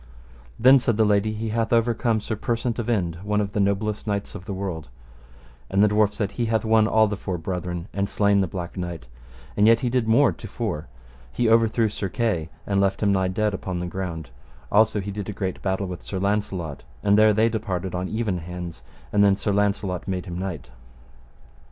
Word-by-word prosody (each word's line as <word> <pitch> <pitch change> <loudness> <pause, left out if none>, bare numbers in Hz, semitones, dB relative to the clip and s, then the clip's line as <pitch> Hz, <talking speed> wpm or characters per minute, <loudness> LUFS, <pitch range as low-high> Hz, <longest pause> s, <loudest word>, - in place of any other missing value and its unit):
Then, 130 +3 +7
said 120 -4 0
the 110 - +4
lady, 105 +1 +2
he 110 +1 -3
hath 115 +1 -1
overcome 115 -1 +2
Sir 110 - -3
Persant 120 +1 -2
of 120 0 -2
Inde, 85 -7 0
one 105 +1 0
of 100 -1 -1
the 105 - -2
noblest 100 +2 0
knights 100 -1 -2
of 90 - -8
the 100 - -4
world, 90 -6 -5 0.8
and 100 +2 +3
the - - +6
dwarf 105 0 +3
said, 100 -2 -1
He 120 -2 -2
hath 110 -1 0
won 110 -1 +4
all 110 0 +4
the 105 - -2
four 95 -2 -4
brethren 90 0 -4
and 100 0 -1
slain 100 -1 +3
the 95 - 0
Black 85 0 -6
Knight, 85 -7 -5 0.5
and 105 +1 +4
yet 115 0 +5
he 125 - 0
did 125 -3 +1
more 115 +4 +5
to 110 - -9
fore: 100 -8 -4 0.4
he 120 - 0
overthrew 115 0 +4
Sir 100 -2 -4
Kay 90 -7 -1 0.2
and 100 -1 +1
left 100 +1 0
him 100 - +3
nigh 95 -1 +2
dead 105 +3 0
upon 95 -1 -4
the 90 - -3
ground; 85 -6 -5 0.4
also 110 0 +4
he 100 +1 -4
did 100 0 -5
a - - -3
great 95 -2 -4
battle 95 0 -1
with 90 -2 -6
Sir 95 - -5
Launcelot, 95 -6 -2 0.2
and 100 0 +4
there 110 +1 +6
they 110 +2 +3
departed 95 -5 -3
on 90 +1 -2
even 110 -5 -1
hands: 90 0 -7 0.3
and 100 0 +5
then 100 -1 +5
Sir 100 +1 -2
Launcelot 100 -2 0
made 95 -2 -2
him 85 - -6
knight. 95 -4 -5
100 Hz, 215 wpm, -24 LUFS, 95-110 Hz, 0.8 s, Then